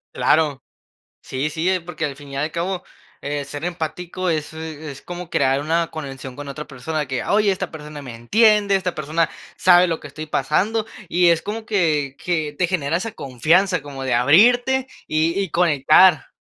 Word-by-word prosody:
Claro, 150 -4 +2 0.6
sí, 135 +4 -3
sí, 175 +5 0
porque 165 -2 -3
al 140 -2 -6
fin 145 0 -13
y 135 - -6
al 150 +3 -1
cabo, 180 +3 -3 0.4
eh, 145 0 -3
ser 145 +3 -7
empático 175 +1 -3
es 155 -1 -2
es 155 -3 -7
como 175 -1 -7
crear 135 -4 +1
una 165 +3 0
conexión 135 -4 -7
con 145 -1 -7
otra 150 +2 -6
persona 150 +3 -4
que, 130 -1 -3
oye, 210 0 +2
esta 190 -1 -4
persona 150 -2 -9
me 130 -4 -9
entiende, 205 - +3
esta 185 -2 -2
persona 155 +2 0 0.3
sabe 180 0 +6
lo 165 -1 -2
que 145 - -9
estoy 150 +2 -7
pasando, 210 +10 0 0.2
y 175 0 +4
es 170 -1 +3
como 220 +2 -5
que 155 -10 0
que 155 -5 -2
te 180 - +2
genera 165 -3 -1
esa 220 +5 -4
confianza 165 +7 +1
como 135 -2 -7
de 130 -2 0
abrirte, 245 - +4 0.2
y 160 +4 +1
y 195 -3 -1
conectar. 160 +1 +4
160 Hz, 180 wpm, -21 LUFS, 145-180 Hz, 0.6 s, sabe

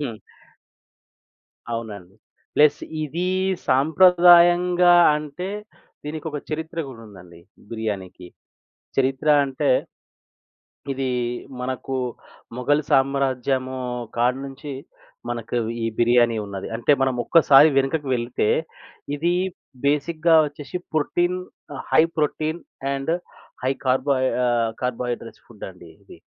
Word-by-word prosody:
హ్మ్. 115 -6 -4 1.6
అవునండి. 105 -5 -6 0.4
ప్లస్ 150 0 +4 0.2
ఇదీ 170 +5 -3 0.4
సాంప్రదాయంగా 175 +3 +5 0.2
అంటే 150 +5 -6 0.6
దీనికొక 150 0 -5
చరిత్ర 160 +2 -5
గూడుందండి 95 -8 -13 0.3
బిర్యానికి. 100 -5 -5 0.7
చరిత్ర 135 +2 0 0.2
అంటే, 140 +2 -1 1.2
ఇది 135 0 -2 0.5
మనకు 130 +1 -4 0.6
మొఘల్ 145 +4 +1
సామ్రాజ్యము 135 -1 +1 0.4
కాడ్నుంచి 135 +4 -2 0.6
మనకు 120 0 -4 0.3
ఈ - - +1
బిర్యానీ 120 -1 +3
ఉన్నది. 100 -1 -6
అంటే 120 +5 +2
మనం 130 -1 +1
ఒక్కసారి 150 -2 +6
వెనకకి 135 +2 +1
వెళ్తే 120 -2 -1 0.7
ఇది 170 +4 0 0.5
బేసిక్‌గా 160 +3 +2
వచ్చేసి 145 +3 -7 0.2
protein, 175 +4 0 0.5
high 160 - +6 0.2
protein 155 +2 -1 0.3
and 135 +4 -2 0.5
high 130 - +2
కార్బో 130 +2 +2 0.3
ఆహ్, 115 -2 +1
కార్బోహైడ్రేట్స్ 120 -2 -4
ఫుడ్ 105 - -9
అండి 90 -2 -15
ఇది. - - -15
135 Hz, 90 wpm, -23 LUFS, 120-155 Hz, 1.6 s, ఒక్కసారి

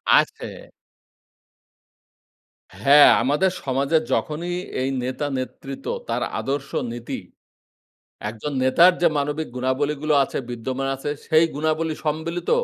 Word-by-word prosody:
আছে। - - -1 2.1
হ্যাঁ, 145 +4 +8
আমাদের 150 +8 +2
সমাজে 135 +4 +1 0.2
যখনই 170 +4 -2 0.3
এই 130 - 0
নেতা-নেতৃত্ব 135 0 -4 0.2
তার - - 0 0.2
আদর্শ, 140 +1 -3 0.2
নীতি 120 0 -5 1.1
একজন 115 +7 -5
নেতার 170 +8 +6
যে 175 - +5
মানবিক 150 +2 -2
গুণাবলী 130 +4 0
গুলো 155 -1 +2
আছে - - -5
বিদ্যমান 130 +3 -3
আছে। 135 +2 -4 0.2
সেই 160 0 +5
গুণাবলী 155 +2 0
সম্মিলিত 160 +3 -2
145 Hz, 105 wpm, -23 LUFS, 130-155 Hz, 2.1 s, হ্যাঁ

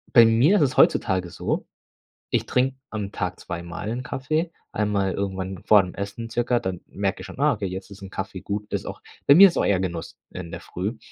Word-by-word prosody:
Bei 115 -2 +10
mir 120 - +5
ist - - +2
es 140 -3 +1
heutzutage 90 -1 +3
so, - - -3 0.6
ich - - +1
trinke 130 +1 +1
am 105 -2 -4
Tag 90 -3 -3
zweimal 85 +4 -6
'n 125 - -3
Kaffee, 155 +7 -2 0.2
einmal 100 -3 0
irgendwann 95 -1 -3
vor 105 -3 +6
dem 90 - -7
Essen 100 +3 -5
circa, 120 +1 +1
dann 95 -4 -4
merke 100 -1 -2
ich - - -8
schon: - - -11
„Ah, 150 0 +4
okay, 100 -4 -3
jetzt 95 +2 -7
ist 100 - -11
'n 95 - -8
Kaffee 95 -1 -5
gut“, 105 +1 -3
das - - -2
auch - - -7 0.3
bei 140 - +8
mir 195 +3 +10
ist 175 - -2
auch - - +2
eher 100 -2 +3
Genuss 85 -3 -4
in 85 -2 -7
der - - -6
Früh. 100 +6 -4
100 Hz, 220 wpm, -24 LUFS, 95-120 Hz, 0.6 s, Bei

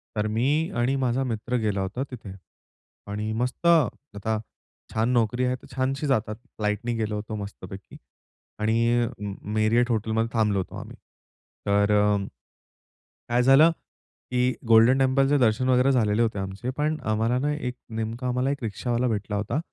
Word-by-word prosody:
तर 105 0 0
मी 145 +8 +1
आणि 120 +3 +1
माझा 130 -1 0
मित्र 120 0 -3
गेलो 105 -3 -1
होता. 95 +7 -3
तिथे 110 -6 -8 0.8
आणि 105 +1 -3
मस्त 125 +7 -3
आता 125 - +1 0.5
छान 110 +2 +1
नोकरी 120 +1 +1
आहे 125 0 0
तर 125 - -15
छानशी 135 +3 -1
जातात, 110 -5 0 0.2
फ्लाइटनी 105 +3 -1
गेलो 110 -1 -2
होतो 105 +1 -5
मस्तपैकी. 100 -2 -8 0.6
आणि 115 +2 +2
अ, - - 0 0.5
Marriott 115 +3 +3
Hotel 110 0 -1
मध्ये 115 +1 +1
थांबलो 105 -3 +2
होतो 95 - -5
आम्ही. - - -10 0.7
तर 100 +1 +3 1.4
काय 120 +1 +3
झालं, 135 +6 +7 0.6
की 125 0 +2
गोल्डन 115 +3 +6
टेम्पलचे 135 +2 +3
दर्शन 125 0 +2
वगैरे 130 +1 +4
झालेले 110 -4 +2
होते 110 -3 0
आमचे. 95 +5 -5
पण 155 +1 0
आम्हाला 115 +3 +1
ना 145 +3 0
एक 125 -4 -4 0.2
नेमका, 115 +3 -3
आम्हाला 125 +2 0
एक 140 -2 -5
रिक्षावाला 120 +3 -1
भेटला 105 -2 -2
होता. 105 +8 -1
120 Hz, 150 wpm, -25 LUFS, 110-130 Hz, 1.4 s, झालं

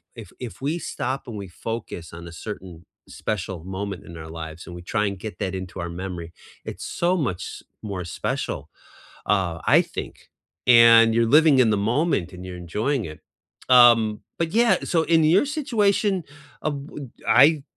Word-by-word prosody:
if - - -10
if 125 -1 -8
we 150 +5 -1
stop 135 -4 -4
and 115 - -6
we 100 -1 -6 0.2
focus 105 -8 -5
on 85 +1 -9
a - - -9 0.2
certain 90 -5 -8 0.2
special 95 -5 -4
moment 95 0 -5
in 85 - -11
our 80 0 -9
lives, 80 0 -8
and 90 - -9
we 85 - -8
try 105 +4 0
and 100 -2 -5
get 110 +1 -7
that 95 -2 -2
into 95 0 -7
our 85 0 -4
memory, 85 -1 -6 0.3
it's - - -6
so 175 +2 0
much 115 - -2
s - - -8 0.2
more 95 -4 -5
special, 75 -3 -4 0.6
uh, 95 -5 0
I - - +6
think, - - -8 0.4
and 115 -2 +7
you're 115 0 +4
living 160 -4 +4
in 115 -4 +5
the 105 - +2 0.2
moment, 140 - 0
and 90 0 -9
you're 90 -1 -7
enjoying 115 - -1
it. 75 0 -9 0.5
Um, 120 -4 +6 0.2
but 165 -1 0
yeah 235 +1 +5
so, 165 -2 +1
in 165 -1 +3
your 170 - +4
situation, 210 - +1 0.4
uh 155 - -1
bu 140 -1 -7 0.2
I 145 +3 +6
110 Hz, 180 wpm, -24 LUFS, 90-145 Hz, 0.6 s, and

